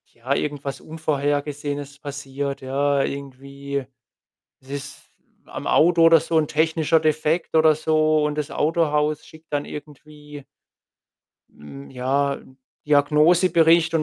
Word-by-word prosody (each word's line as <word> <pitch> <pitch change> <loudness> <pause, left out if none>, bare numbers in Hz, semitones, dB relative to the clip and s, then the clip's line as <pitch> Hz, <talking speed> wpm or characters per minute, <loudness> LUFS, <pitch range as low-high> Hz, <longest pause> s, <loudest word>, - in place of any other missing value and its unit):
ja, 125 +4 -2
irgendwas 140 -2 -4
Unvorhergesehenes 145 -2 -3
passiert, 140 -1 -5
ja, 140 +1 0
irgendwie 140 0 -6 0.8
es 130 - -22
ist 140 0 -8 0.3
am - - -8
Auto 170 +1 +4
oder 165 0 +7
so 165 +1 -2
'n 155 -2 0
technischer 160 +1 +2
Defekt 155 +2 0
oder 160 -1 +5
so 155 -1 +2
und 150 0 -2
das 150 -2 -3
Autohaus 150 -1 0
schickt 160 0 -18
dann 145 0 -1
irgendwie 150 -1 -11 1.1
mm, 70 -1 -12
ja, 140 +3 0
'n 130 - -14 0.3
Diagnosebericht 165 +3 +4
und 160 - +2
150 Hz, 120 wpm, -22 LUFS, 140-155 Hz, 1.1 s, oder